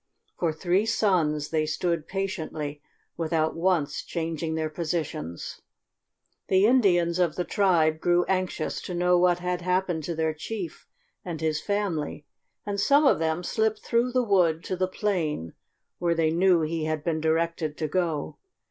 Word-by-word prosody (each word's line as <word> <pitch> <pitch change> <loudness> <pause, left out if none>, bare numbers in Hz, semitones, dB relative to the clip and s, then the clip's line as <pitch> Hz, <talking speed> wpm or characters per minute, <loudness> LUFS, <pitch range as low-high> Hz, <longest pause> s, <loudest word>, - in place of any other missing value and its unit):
For 170 -2 +1
three 180 +6 +1
suns 160 -9 +1
they 155 -1 +1
stood 170 0 -1
patiently 160 -7 -4 0.4
without 160 -1 0
once 165 -4 +1
changing 165 -1 -3
their 160 -1 -1
positions. 155 - -4 0.9
The 190 +1 +4
Indians 180 -8 +3
of 170 -4 +2
the 180 - -1
tribe 170 -6 +2
grew 175 +1 +3
anxious 185 -4 -1
to 180 - -5
know 180 0 +3
what 175 -1 +4
had 180 0 -2
happened 180 -2 0
to 170 - -3
their 160 0 0
chief 175 +2 -6 0.4
and 170 -3 -5
his 155 -1 0
family, 180 -8 -2 0.4
and 200 -1 -2
some 285 +8 +4
of 270 - +4
them 160 +2 0
slipped 220 +3 0
through 235 +2 +1
the 255 0 +2
wood 180 -6 +2
to 185 - -3
the 185 0 0
plain 170 - -2 0.5
where 170 -1 +1
they 160 -1 +2
knew 175 0 +4
he 160 0 -1
had 155 -1 -2
been 160 -2 -1
directed 160 -1 0
to 155 - -1
go. 165 -2 -2
170 Hz, 155 wpm, -26 LUFS, 155-185 Hz, 0.9 s, The